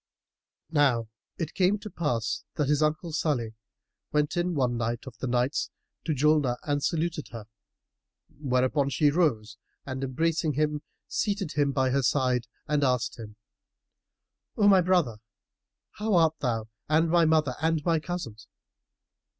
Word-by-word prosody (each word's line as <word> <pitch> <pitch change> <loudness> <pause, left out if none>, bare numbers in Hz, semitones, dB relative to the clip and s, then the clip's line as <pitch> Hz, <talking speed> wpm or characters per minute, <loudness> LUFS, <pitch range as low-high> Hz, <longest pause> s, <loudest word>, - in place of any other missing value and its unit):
Now 130 -8 +2 0.3
it 165 -4 -4
came 190 +2 +2
to 210 - -9
pass 120 -9 -1
that 145 -2 0
his 150 0 +2
uncle 155 +2 0
Salih 130 -8 -1 0.6
went 150 0 +1
in 175 0 0
one 125 -4 +1
night 120 +1 -2
of 130 -3 -9
the 130 - -3
nights 125 +3 0 0.4
to 160 - 0
Julnar 145 -3 +2
and 145 -1 -1
saluted 165 -2 -1
her; 115 -3 -9 0.9
whereupon 135 +1 +1
she 145 +1 +3
rose 115 -10 0 0.3
and 130 0 -4
embracing 155 +4 0
him 150 +1 0 0.3
seated 200 -6 -1
him 145 -2 +1
by 130 -1 +1
her 140 +1 +2
side 125 -1 +1 0.2
and 150 -1 +1
asked 125 -2 0
him, 105 -2 -9 1.2
"O 205 - +4
my 195 -2 +7
brother, 175 -11 +2 0.7
how 210 -1 -1
art 160 -2 +3
thou 115 -5 -1 0.2
and 160 +1 +3
my 170 -1 +5
mother 155 -4 +2
and 160 -2 +1
my 165 -2 +3
cousins?" 145 -11 -6
145 Hz, 145 wpm, -27 LUFS, 125-160 Hz, 1.2 s, my